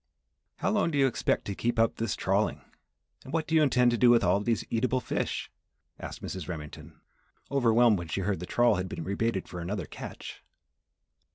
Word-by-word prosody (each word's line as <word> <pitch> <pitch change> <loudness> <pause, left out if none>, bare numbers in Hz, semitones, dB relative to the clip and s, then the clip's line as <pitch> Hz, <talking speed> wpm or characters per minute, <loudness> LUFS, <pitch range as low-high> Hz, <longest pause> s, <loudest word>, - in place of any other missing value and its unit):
"How 195 - -1
long 210 -5 +2
do 150 - -2
you 135 - +5
expect 130 - 0
to 100 - -3
keep 120 +4 -1
up 115 0 +2
this 115 -2 -1
trawling, - - 0 0.6
and 130 - -10
what 160 0 0
do 160 - -5
you 160 - +5
intend 125 -4 +4
to 120 - -1
do 125 - +6
with 120 -2 +5
all 90 +1 +3
of 100 - -4
these 115 -2 0
eatable 125 +3 +1
fish," - - -3 0.5
asked - - -8
Mrs. 95 -4 -5
Remington, 75 -1 -8 0.5
overwhelmed 120 -5 +4
when 85 - -6
she 95 - -2
heard 95 -2 -1
the 90 - -6
trawl 120 -5 +3
had 90 0 -3
been 85 - -5
rebaited 100 +2 -1
for 90 - -7
another 90 +1 -3
catch. - - -9
115 Hz, 200 wpm, -28 LUFS, 90-125 Hz, 0.6 s, do